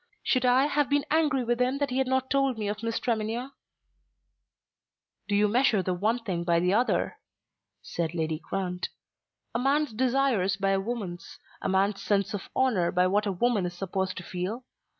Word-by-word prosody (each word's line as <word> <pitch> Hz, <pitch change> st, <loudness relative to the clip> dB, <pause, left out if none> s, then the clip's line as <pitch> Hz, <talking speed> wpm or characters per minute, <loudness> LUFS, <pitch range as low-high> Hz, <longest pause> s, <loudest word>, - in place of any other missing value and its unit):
Should 255 Hz, -1 st, +2 dB
I 255 Hz, +2 st, +5 dB
have 290 Hz, -2 st, +1 dB
been 285 Hz, 0 st, +2 dB
angry 300 Hz, -5 st, +2 dB
with 240 Hz, +1 st, 0 dB
him 255 Hz, +2 st, +2 dB
had 280 Hz, -2 st, -1 dB
he 265 Hz, +1 st, +2 dB
not 260 Hz, 0 st, -1 dB
told 275 Hz, -3 st, +2 dB
me 210 Hz, -2 st, -2 dB
of 210 Hz, +1 st, -3 dB
Miss 230 Hz, 0 st, -1 dB
Tremenhere?" 230 Hz, +3 st, -2 dB, 1.8 s
"Do 205 Hz, -, 0 dB
you 210 Hz, +1 st, +4 dB
measure 225 Hz, -3 st, +3 dB
the 185 Hz, -, 0 dB
one 215 Hz, +6 st, +1 dB
thing 190 Hz, -8 st, -3 dB
by 170 Hz, -1 st, +2 dB
the 180 Hz, +2 st, +2 dB
other," 240 Hz, +4 st, +1 dB, 0.6 s
said 170 Hz, 0 st, -3 dB
Lady 160 Hz, -1 st, -1 dB
Grant; 180 Hz, -1 st, -3 dB, 0.6 s
"a 235 Hz, -, 0 dB
man's 275 Hz, 0 st, +1 dB
desires 250 Hz, -5 st, +2 dB
by 195 Hz, 0 st, +1 dB
a 195 Hz, -, +2 dB
woman's, 195 Hz, -5 st, -5 dB, 0.2 s
a -, -, -1 dB
man's 195 Hz, +2 st, +1 dB
sense 200 Hz, 0 st, 0 dB
of 205 Hz, -, -5 dB
honour 215 Hz, -10 st, +2 dB
by 180 Hz, 0 st, +3 dB
what 205 Hz, +3 st, +1 dB
a -, -, +1 dB
woman 215 Hz, +2 st, +1 dB
is 175 Hz, -, -7 dB
supposed 190 Hz, 0 st, -2 dB
to 185 Hz, -, -6 dB
feel? 190 Hz, +9 st, -4 dB
215 Hz, 185 wpm, -28 LUFS, 190-255 Hz, 1.8 s, I